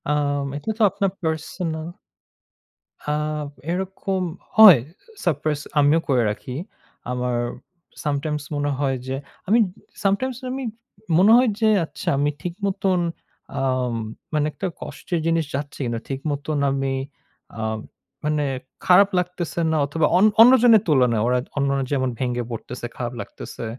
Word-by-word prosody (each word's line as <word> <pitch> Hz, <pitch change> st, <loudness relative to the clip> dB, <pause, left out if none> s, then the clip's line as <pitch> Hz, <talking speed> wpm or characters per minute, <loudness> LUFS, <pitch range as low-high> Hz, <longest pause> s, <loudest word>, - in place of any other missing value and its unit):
আম 145 Hz, -1 st, +1 dB
এটা 145 Hz, -, -6 dB
তো -, -, -4 dB
আপনার 200 Hz, -1 st, 0 dB
পার্সোনাল 160 Hz, 0 st, -3 dB, 1.1 s
আ 150 Hz, -, -4 dB, 0.6 s
এরকম 190 Hz, +1 st, -2 dB, 0.3 s
হয়। 210 Hz, -, +10 dB
আ -, -, -20 dB, 0.3 s
Surprise 150 Hz, -2 st, 0 dB, 0.2 s
আমিও 145 Hz, +3 st, +5 dB
করে 130 Hz, -3 st, +4 dB
রাখি। 125 Hz, +4 st, -5 dB, 0.6 s
আমার 125 Hz, -1 st, -1 dB, 0.7 s
sometimes 150 Hz, 0 st, -1 dB
মনে 145 Hz, 0 st, 0 dB
হয় 135 Hz, -2 st, +1 dB
যে 130 Hz, -, -2 dB, 0.3 s
আমি 220 Hz, +5 st, +4 dB, 0.4 s
sometimes 215 Hz, +6 st, +1 dB
আমি 265 Hz, +1 st, -3 dB, 0.5 s
মনে 195 Hz, +5 st, +6 dB
হয় 250 Hz, -1 st, +4 dB
যে, 220 Hz, -, +5 dB, 0.2 s
আচ্ছা, -, -, -11 dB
আমি 145 Hz, +1 st, +2 dB
ঠিক 175 Hz, -, -4 dB
মতন 190 Hz, -1 st, +1 dB, 0.6 s
আম 130 Hz, -2 st, 0 dB, 0.4 s
মানে 150 Hz, -1 st, +2 dB
একটা 190 Hz, -, -4 dB
কষ্টের 175 Hz, -3 st, -4 dB
জিনিস 165 Hz, -1 st, +2 dB
যাচ্ছে 140 Hz, +1 st, -5 dB
কিনা? 120 Hz, -1 st, -2 dB
ঠিক 135 Hz, -1 st, -3 dB
মতন 145 Hz, +1 st, -2 dB
আমি 135 Hz, 0 st, -1 dB, 0.7 s
আ -, -, -2 dB, 0.6 s
মানে 150 Hz, -1 st, +1 dB, 0.4 s
খারাপ 195 Hz, +2 st, +6 dB
লাগতেছেনা 170 Hz, -2 st, -1 dB
অথবা, 150 Hz, +2 st, 0 dB
অন 190 Hz, -, +6 dB, 0.2 s
অন্যজনের 240 Hz, -2 st, +7 dB
তুলনায়। 125 Hz, -7 st, +3 dB
ওরা 125 Hz, 0 st, +3 dB, 0.2 s
অন্যরা 140 Hz, -1 st, +1 dB
যেমন 130 Hz, -2 st, +1 dB
ভেঙে 125 Hz, -1 st, -1 dB
পড়তেছে, 120 Hz, +2 st, -6 dB
খারাপ 120 Hz, -1 st, -3 dB
লাগতেছে। 115 Hz, -, -8 dB
150 Hz, 135 wpm, -23 LUFS, 135-185 Hz, 1.1 s, হয়